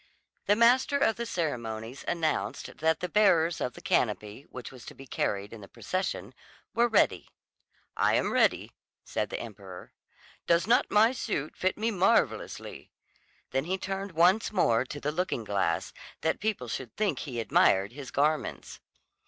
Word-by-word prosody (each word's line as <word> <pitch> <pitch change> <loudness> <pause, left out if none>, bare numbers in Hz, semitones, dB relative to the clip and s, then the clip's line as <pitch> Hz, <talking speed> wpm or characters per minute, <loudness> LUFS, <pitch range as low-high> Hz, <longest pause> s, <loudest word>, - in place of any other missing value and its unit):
The 205 - +5
master 250 +5 +4
of 250 -6 +2
the 235 0 -3
ceremonies 120 - -4
announced 155 - -2
that 160 +1 +1
the 180 - -1
bearers 170 -5 +3
of 125 - -2
the - - -12
canopy, 105 +2 -1
which 125 - -8
was 130 -3 -13
to - - -10
be 135 - -12
carried 100 -4 -2
in 110 - -10
the 100 - -11
procession, 185 - -4 0.4
were 240 0 +3
ready. 225 - +2 0.7
"I - - +3
am - - +1
ready," - - +2 0.3
said - - -3
the - - -4
emperor. - - -10 0.5
"Does 170 +1 +3
not 240 +5 +3
my 220 +3 +5
suit 200 - -3
fit 185 0 0
me 225 +2 0
marvellously?" 190 -2 0 0.6
Then 135 +2 0
he 185 +3 -1
turned 195 0 -4
once 180 +7 +3
more 125 - +2
to 145 +3 -7
the 145 +1 -2
looking 165 -7 -2
glass, 95 -6 -1 0.3
that 160 - 0
people 210 - -2
should 120 +1 -5
think 210 -3 0
he 125 -6 -5
admired 100 -3 +3
his 135 +1 -9
garments. 150 +2 -1
160 Hz, 160 wpm, -29 LUFS, 120-205 Hz, 0.7 s, The